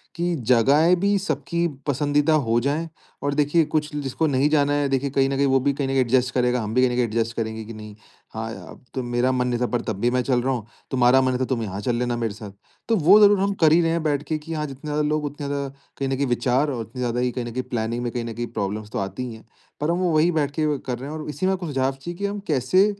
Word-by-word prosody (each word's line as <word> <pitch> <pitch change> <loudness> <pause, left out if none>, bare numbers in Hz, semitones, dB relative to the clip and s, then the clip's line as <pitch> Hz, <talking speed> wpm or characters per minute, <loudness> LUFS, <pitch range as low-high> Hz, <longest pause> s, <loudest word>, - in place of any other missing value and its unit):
कि 175 +1 0 0.2
जगहें 145 +9 +5
भी 200 +1 +2
सबकी 170 -3 -1 0.2
पसंदीदा 145 +2 +2
हो 115 +1 +3
जाए। 150 +5 -1 0.3
और 145 0 0
देखिए 150 +3 +3
कुछ 150 0 -2
जिसको 145 +2 -1
नहीं 140 +1 +2
जाना 145 -2 +2
है 145 -1 +1
देखिए 135 +1 0
कहीं 135 0 +2
न 135 - -1
कहीं 140 - +3
वो 135 0 +4
भी 140 +2 +1
कहीं 140 -1 -2
न - - -3
कहीं 135 - +2
एडजस्ट 125 0 +2
करेगा, 125 -1 +1
हम 105 0 -4
भी 125 - +3
कहीं 130 - +3
न - - -2
कहीं 125 - +2
एडजस्ट 115 0 -2
करेंगे 110 -1 -3
कि 115 - -8
नहीं, 105 -1 -10 0.4
हाँ 110 0 -4
या - - -10 0.2
तो 130 - -2
मेरा 120 +1 +1
मन 125 -1 0
नहीं 120 -1 -1
था 125 - +2
पर 120 -1 -1
तब 105 -3 -3
भी 120 - +3
मैं 125 - +2
चल 125 -1 +1
रहा 135 +2 0
हूँ। 120 -4 -4 0.3
तुम्हारा 130 0 +5
मन 130 - +2
नहीं 125 - -1
था - - +2
तुम 125 -3 -1
यहाँ 100 -2 -5
चल 120 +2 0
लेना 120 0 -1
मेरे 115 -3 -2
साथ। 105 -1 -9 0.4
तो 225 - +4
वो 190 +3 +6
ज़रूर 205 -1 +6
हम 200 +1 +1
कर 155 - +6
ही 170 +2 +5
रहे 165 - +1
हैं 165 -1 -1
बैठ 145 -2 0
के 155 +1 -2
कि 165 +2 -7
हाँ, 150 -1 -2
जितने 140 +2 -9
ज़्यादा 150 0 0
लोग 150 0 0
उतने 145 0 -5
ज़्यादा 140 0 -2 0.3
कहीं 135 -1 -2
न 135 - 0
कहीं 140 +2 0
विचार 125 +4 +1
और 120 -4 -3
उतनी 115 +3 -9
ज़्यादा 120 0 0
कहीं 125 -1 -4
न 120 - -5
कहीं 130 +2 -3
प्लानिंग 120 0 -3
में 120 - -2
कहीं 120 -2 -3
न 115 - -5
कहीं 120 +2 -4
प्रॉब्लम्स 105 +1 -3
तो - - -2
आती 95 +5 -4
ही 120 - -7
है। 110 - -14 0.4
पर 150 - +1
हम 170 - 0
वो 180 -2 +1
वही 160 +3 +4
बैठ 150 -3 0
के 150 -2 +1
कर 125 -2 -4
रहे 135 - -6
है - - -5
और 155 - -6
इसी 170 +5 -3
में 190 - +3
आपको 180 -2 -4
सुझाव 135 -2 0
चाहिए 170 +6 -8
कि 200 - -2
हम 200 +1 -2
कैसे 150 +7 +3
135 Hz, 295 wpm, -23 LUFS, 120-150 Hz, 0.4 s, वो